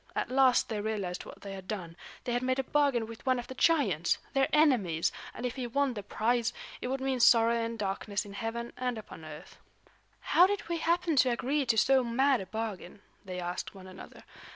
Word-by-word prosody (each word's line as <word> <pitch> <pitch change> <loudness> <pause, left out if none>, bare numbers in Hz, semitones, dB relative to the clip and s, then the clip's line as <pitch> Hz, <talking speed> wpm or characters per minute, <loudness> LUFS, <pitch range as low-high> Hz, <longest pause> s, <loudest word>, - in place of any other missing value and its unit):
At - - -2
last 260 -1 +4
they 215 -2 -3
realized 205 -4 -3
what - - -12
they 200 -1 -7
had 190 -1 -9
done; 180 -6 -5 0.3
they 245 - -2
had 245 - 0
made 255 0 0
a 270 - 0
bargain 275 -4 +1
with 225 0 -11
one 255 0 +2
of 245 - -4
the - - -8
giants, 230 - +2 0.2
their 270 -1 +3
enemies; 235 - +3 0.2
and 245 - -6
if 245 - -2
he 250 -2 -3
won 275 +2 0
the 210 - -5
prize, 230 +3 0 0.3
it - - -3
would 265 +1 -2
mean 265 -1 -1
sorrow 230 -1 +6
and 230 0 -2
darkness 200 +1 -2
in 200 - -10
heaven 235 +2 -4
and 250 -2 -2
upon 205 -6 -10
earth. 155 -1 -11 0.6
"How 360 - +5
did 405 -2 -3
we 340 0 -1
happen 335 -1 +1
to 255 - +5
agree 265 +4 0
to 225 -1 +2
so 265 +3 +4
mad 260 +2 +2
a 190 - -8
bargain?" 210 -3 -6 0.2
they 185 -1 -5
asked 175 +3 -4
one 190 -1 -11
another. 185 0 -12
235 Hz, 215 wpm, -30 LUFS, 200-265 Hz, 0.6 s, sorrow